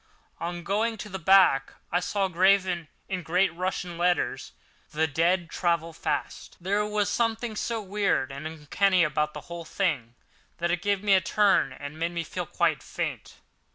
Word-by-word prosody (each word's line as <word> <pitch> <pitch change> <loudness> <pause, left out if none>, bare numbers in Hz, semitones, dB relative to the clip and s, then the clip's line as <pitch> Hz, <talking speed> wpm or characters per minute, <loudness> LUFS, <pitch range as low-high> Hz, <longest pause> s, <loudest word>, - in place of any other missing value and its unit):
On 175 0 -4
going 220 +5 0
to 210 - -7
the 190 -1 -5
back 175 -6 +5 0.2
I 175 - +3
saw, 195 +2 0
graven 185 -2 +2 0.2
in 185 -2 -3
great 180 +2 +1
Russian 180 -1 -3
letters: 175 0 0 0.4
"The 155 +1 +1
dead 170 +4 +1
travel 170 -2 0
fast." - - -4
There 200 +4 0
was 210 -1 0
something 230 -1 -1
so 225 0 -2
weird 195 -9 0
and 140 +3 -6
uncanny 170 +4 +2
about 150 -1 0
the 150 - -6
whole 170 +2 -8
thing 145 - -2 0.4
that 170 0 0
it 175 0 0
gave 200 -1 0
me 205 -1 +4
a 190 - +5
turn 205 +5 +3
and 145 +2 -8
made 170 +1 -1
me 170 -1 -2
feel - - -5
quite - - +1
faint. - - -5
180 Hz, 170 wpm, -27 LUFS, 165-195 Hz, 0.4 s, back